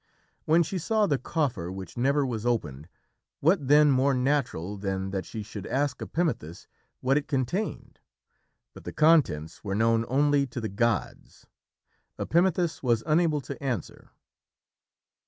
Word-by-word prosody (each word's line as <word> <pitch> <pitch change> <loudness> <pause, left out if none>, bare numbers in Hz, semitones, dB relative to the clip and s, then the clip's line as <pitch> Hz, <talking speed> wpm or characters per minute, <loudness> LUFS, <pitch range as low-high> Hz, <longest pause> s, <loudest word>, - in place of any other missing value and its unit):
When 165 +2 +4
she 180 +3 -4
saw 215 +5 +1
the 145 -7 0
coffer 125 - -2
which 95 -1 -8
never 140 +3 +2
was 115 -4 -3
opened, 80 - -2 0.5
what 160 -2 +2
then 150 +1 +6
more 135 +1 +3
natural 125 - -1
than 95 -1 -3
that 95 -1 -4
she 110 -2 -6
should 100 -1 -8
ask 140 +2 -1
Epimethus 120 - -3 0.4
what 135 +2 +2
it 145 - -11
contained? 140 - -3 0.7
But - - -13
the - - -7
contents 145 - +2
were 100 -2 -2
known 115 +1 +2
only 140 +1 +2
to 120 - -6
the 110 -2 -3
gods. 115 +3 -2 0.7
Epimethus 175 -1 +1
was 120 -4 +1
unable 155 -1 +2
to 140 +1 -8
answer. 125 - -4
130 Hz, 140 wpm, -27 LUFS, 105-150 Hz, 0.7 s, then